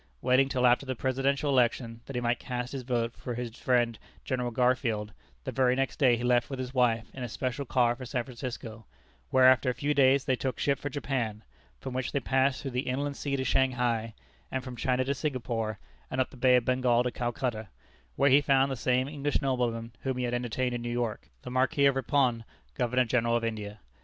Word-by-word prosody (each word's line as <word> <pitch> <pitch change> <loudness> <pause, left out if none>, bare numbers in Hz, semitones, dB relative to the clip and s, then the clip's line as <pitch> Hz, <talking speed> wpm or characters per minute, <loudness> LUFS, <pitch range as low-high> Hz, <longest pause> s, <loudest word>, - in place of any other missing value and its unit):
Waiting 130 - +3
till 125 -2 +1
after 125 +2 +4
the 130 -1 -3
Presidential 135 +3 0
election, 120 -2 +1
that 140 - -7
he 125 - -1
might 120 0 0
cast 125 0 -4
his 135 - -4
vote 120 -2 -1
for 125 - -5
his 120 -1 -5
friend 120 -3 +1 0.3
General 125 -2 -1
Garfield, 120 -4 0 0.3
the - - -4
very 130 -1 +2
next 135 0 -2
day 125 -5 +5
he 120 - -5
left 125 -1 +2
with 135 - -4
his 130 0 -5
wife 115 -3 +1
in 130 - -8
a 125 - -3
special 130 +5 -3
car 120 -1 +2
for 130 - -9
San 125 -1 -2
Francisco, 115 -3 -7 0.4
where 130 -1 +5
after 130 0 +5
a 125 - -1
few 145 +1 0
days, 135 -1 +4
they 130 - +2
took 130 -1 -3
ship 140 -1 +1
for 145 - -4
Japan, 125 -6 -3 0.4
from 130 - -6
which 130 0 -3
they 140 - +2
passed 130 +2 +1
through 135 - -4
the 125 +1 -2
Inland 140 +2 -2
Sea 140 -1 -2
to 130 - -1
Shanghai, 125 -4 +1 0.4
and 130 -1 -2
from 130 -1 -7
China 130 +1 0
to 140 - 0
Singapore, 120 -7 -2 0.3
and 130 - -3
up 130 - +1
the - - -13
Bay 125 0 +4
of 125 -2 +2
Bengal 125 -1 +2
to 125 - -1
Calcutta, 120 -2 -3 0.5
where 140 0 +3
he 140 +2 +7
found 135 -1 +3
the - - -1
same 125 +1 +1
English 145 0 -1
nobleman 120 -3 -1
whom 130 -1 -2
he 125 - -1
had 120 0 -1
entertained 125 +1 -1
in 120 - -3
New 120 - -4
York, 120 -2 -3
the - - -7
Marquis 130 +2 +2
of 140 -1 +4
Ripon, 130 -3 +1 0.3
Governor 125 +1 +1
General 115 0 +1
of 120 - 0
India. 105 -2 -4
125 Hz, 220 wpm, -29 LUFS, 120-130 Hz, 0.5 s, he